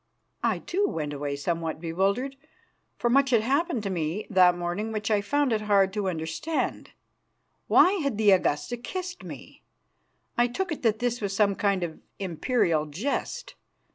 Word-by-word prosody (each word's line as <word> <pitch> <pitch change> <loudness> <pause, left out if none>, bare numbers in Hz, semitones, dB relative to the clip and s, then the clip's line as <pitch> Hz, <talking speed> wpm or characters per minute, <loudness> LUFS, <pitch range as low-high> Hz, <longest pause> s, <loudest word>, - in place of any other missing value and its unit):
I, - - +1
too, 400 +3 0
went 150 -2 -3
away 145 0 -3
somewhat 165 +2 -2
bewildered, 195 +11 0 0.6
for 240 - 0
much 270 +3 +4
had 235 -4 +4
happened 275 +1 0
to 195 - -2
me 170 +3 -2
that 180 -2 +5
morning 175 +6 -3
which 215 0 -2
I 210 -1 +3
found 285 +4 +1
it 215 - 0
hard 200 -2 +3
to 205 -2 -1
understand. 160 - -3 0.8
Why 365 - +6
had 280 -7 -1
the 215 -2 +5
Augusta 185 +5 +1
kissed 365 +8 -6
me? - - -10 0.8
I 240 - +5
took 350 +9 -3
it 315 - -4
that 220 -3 +2
this 245 0 -1
was 200 -1 -2
some 200 -1 +3
kind 195 -2 0
of 160 -2 -5 0.2
imperial 175 -3 0
jest. 195 - -3
205 Hz, 165 wpm, -27 LUFS, 175-245 Hz, 0.8 s, Why